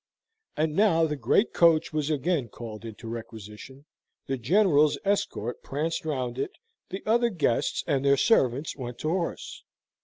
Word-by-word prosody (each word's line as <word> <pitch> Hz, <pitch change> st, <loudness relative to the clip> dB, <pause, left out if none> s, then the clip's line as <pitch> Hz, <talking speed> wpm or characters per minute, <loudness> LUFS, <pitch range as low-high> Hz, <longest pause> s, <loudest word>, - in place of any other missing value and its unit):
And 155 Hz, 0 st, 0 dB
now 170 Hz, -5 st, +4 dB
the 150 Hz, -1 st, -2 dB
great 140 Hz, -, +2 dB
coach 165 Hz, -2 st, +4 dB
was 155 Hz, -1 st, -1 dB
again 150 Hz, -3 st, 0 dB
called 115 Hz, -1 st, -9 dB
into 115 Hz, +1 st, -9 dB
requisition, 115 Hz, +4 st, -9 dB, 0.4 s
the 135 Hz, -, -2 dB
General's 155 Hz, -, +3 dB
escort 160 Hz, -, -1 dB
pranced 155 Hz, +4 st, -3 dB
round 130 Hz, -5 st, -3 dB
it, 135 Hz, -, -3 dB, 0.4 s
the 190 Hz, -, -6 dB
other 235 Hz, +2 st, +3 dB
guests 145 Hz, -, 0 dB
and 140 Hz, -2 st, 0 dB
their 140 Hz, 0 st, +4 dB
servants 135 Hz, -, +2 dB
went 125 Hz, -3 st, -7 dB
to 155 Hz, -, -1 dB
horse. 170 Hz, 0 st, -3 dB
145 Hz, 150 wpm, -27 LUFS, 120-165 Hz, 0.4 s, now